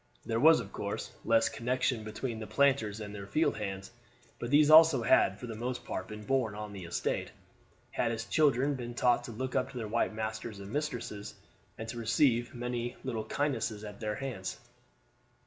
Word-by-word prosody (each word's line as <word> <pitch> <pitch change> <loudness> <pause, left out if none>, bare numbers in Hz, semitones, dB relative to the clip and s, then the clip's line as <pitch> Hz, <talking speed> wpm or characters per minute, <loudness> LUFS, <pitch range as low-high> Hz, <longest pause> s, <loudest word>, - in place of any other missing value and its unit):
There 115 0 0
was, 160 +5 +7
of - - -7
course, - - -4
less 115 0 +4
connection 125 -1 -1
between 110 +2 -4
the 110 - -6
planters 110 -3 +2
and 105 -1 -6
their 100 -1 -7
field 155 +8 +1
hands; 95 0 -5 0.5
but 120 - -4
these 145 +2 +5
also 160 -5 +8
had 100 -4 +4
for - - -6
the 115 - -5
most 120 +3 -4
part 95 - -4
been 105 0 -8
born 125 -4 +1
on 105 -1 -6
the 95 -3 -7
estate, 85 - -2 0.6
had 115 - 0
as 115 0 -3
children 140 0 +3
been 120 -3 -6
taught 120 0 +3
to 120 - -7
look 130 +3 -4
up 130 - +1
to 135 - -9
their 115 -3 -3
white 110 0 0
masters 110 0 -4
and 100 +1 -8
mistresses, 125 -8 -4 0.4
and 110 - -6
to 120 - -5
receive 120 +1 +2
many 120 0 -3
little 115 -4 -3
kindnesses 115 -6 -1
at 105 -1 -8
their 105 -2 -2
hands. 115 -8 -5
115 Hz, 190 wpm, -31 LUFS, 110-130 Hz, 0.6 s, also